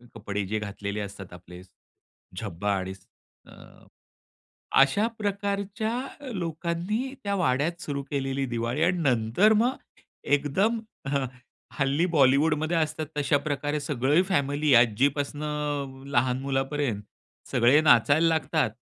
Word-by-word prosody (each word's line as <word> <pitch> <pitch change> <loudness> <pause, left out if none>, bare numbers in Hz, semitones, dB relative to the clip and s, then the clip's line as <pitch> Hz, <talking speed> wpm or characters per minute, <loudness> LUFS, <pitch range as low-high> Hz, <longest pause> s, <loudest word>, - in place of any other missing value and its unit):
कपडे 105 -2 -3
जे 110 +2 -1
घातलेले 100 0 -5
असतात 95 -3 -8
आपले 90 0 -12 0.8
झब्बा 100 +5 -3
आणि 95 0 -4 0.5
अ, - - -15 1.3
अशा 140 +11 +4
प्रकारच्या 200 +1 -2 0.4
लोकांनी 175 - -3
त्या 200 0 0
वाड्यात 150 +2 0
सुरू 140 -1 -3
केलेली 135 -1 -1
दिवाळी 120 +4 -2
आणि 180 0 +1
नंतर 125 - +3
मग 245 +4 +2 0.5
एकदम 150 +11 +1 0.3
हं, 135 -1 0 0.5
हल्ली 140 +5 +2
बॉलिवूडमध्ये 150 +4 +3
असतात 155 -1 -1
तशा 145 0 +2
प्रकारे 145 0 -2
सगळी 145 +4 +2
फॅमिली 145 -4 +1
आजीपासणं 140 +3 0
लहान 125 -1 +2
मुलापर्यंत 135 -4 -1 0.5
सगळे 125 +6 +5
नाचायला 150 +2 +5
लागतात 160 -5 +1
145 Hz, 110 wpm, -26 LUFS, 125-165 Hz, 1.3 s, सगळे